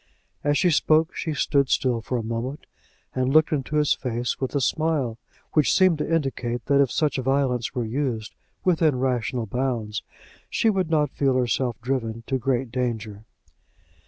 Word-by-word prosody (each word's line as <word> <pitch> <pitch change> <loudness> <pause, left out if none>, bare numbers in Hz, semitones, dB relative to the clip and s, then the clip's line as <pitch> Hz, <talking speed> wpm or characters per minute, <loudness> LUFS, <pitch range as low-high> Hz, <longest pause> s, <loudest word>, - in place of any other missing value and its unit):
As 145 0 +2
she 175 +5 +3
spoke 155 +1 +3
she 160 -2 -3
stood 140 -2 +2
still 125 -3 +1
for 125 +2 -2
a 115 - -3
moment, 115 +5 -4 0.5
and 130 0 0
looked 155 +1 +4
into 150 0 -2
his 150 -1 +3
face 120 0 -3
with 130 +2 -2
a - - +3
smile 140 -5 0 0.3
which 150 -3 +3
seemed 185 -5 +4
to 150 - -2
indicate 130 -6 -1
that 140 +1 +4
if 135 - +2
such 150 -3 +1
violence 130 -2 0
were 120 -2 -1
used, 115 -2 -2 0.3
within 165 -5 +3
rational 125 -2 -1
bounds, 115 -2 -2 0.5
she 225 - +2
would 190 -5 -1
not 150 -3 +2
feel 135 -2 +1
herself 125 -1 0
driven 115 -3 -2
to 135 -1 -1
great 125 -1 -1
anger. 110 -4 -3
130 Hz, 165 wpm, -24 LUFS, 120-150 Hz, 0.5 s, looked